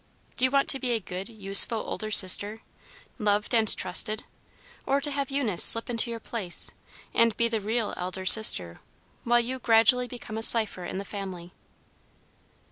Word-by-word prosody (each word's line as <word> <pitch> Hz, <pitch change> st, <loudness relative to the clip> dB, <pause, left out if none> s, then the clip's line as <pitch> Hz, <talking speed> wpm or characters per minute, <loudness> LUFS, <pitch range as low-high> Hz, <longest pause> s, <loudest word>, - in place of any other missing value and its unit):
Do 255 Hz, -, +1 dB
you -, -, +1 dB
want 275 Hz, +1 st, 0 dB
to 270 Hz, -, +3 dB
be 250 Hz, -2 st, -3 dB
a 230 Hz, -, -2 dB
good, 185 Hz, +1 st, -9 dB
useful 205 Hz, +1 st, +3 dB
older 215 Hz, 0 st, -6 dB
sister, 205 Hz, +2 st, +3 dB, 0.6 s
loved 210 Hz, 0 st, -1 dB
and 220 Hz, -2 st, +1 dB
trusted, 215 Hz, +1 st, -1 dB, 0.6 s
or 275 Hz, +1 st, 0 dB
to 290 Hz, +1 st, -3 dB
have 280 Hz, -1 st, -4 dB
Eunice 255 Hz, -10 st, 0 dB
slip 230 Hz, +1 st, +3 dB
into 235 Hz, 0 st, 0 dB
your 230 Hz, -1 st, -7 dB
place, 205 Hz, -6 st, -1 dB, 0.4 s
and 230 Hz, -2 st, +1 dB
be 235 Hz, -, 0 dB
the 225 Hz, -2 st, -4 dB
real 220 Hz, +2 st, -4 dB
elder 185 Hz, +1 st, -7 dB
sister, 90 Hz, -, +6 dB, 0.5 s
while 240 Hz, 0 st, +2 dB
you 255 Hz, +2 st, -5 dB
gradually 245 Hz, +2 st, +2 dB
become 230 Hz, -3 st, -9 dB
a -, -, -7 dB
cipher 215 Hz, -6 st, 0 dB
in 185 Hz, -, -7 dB
the 200 Hz, -, -7 dB
family?" 185 Hz, -4 st, -9 dB
225 Hz, 170 wpm, -25 LUFS, 200-240 Hz, 0.6 s, sister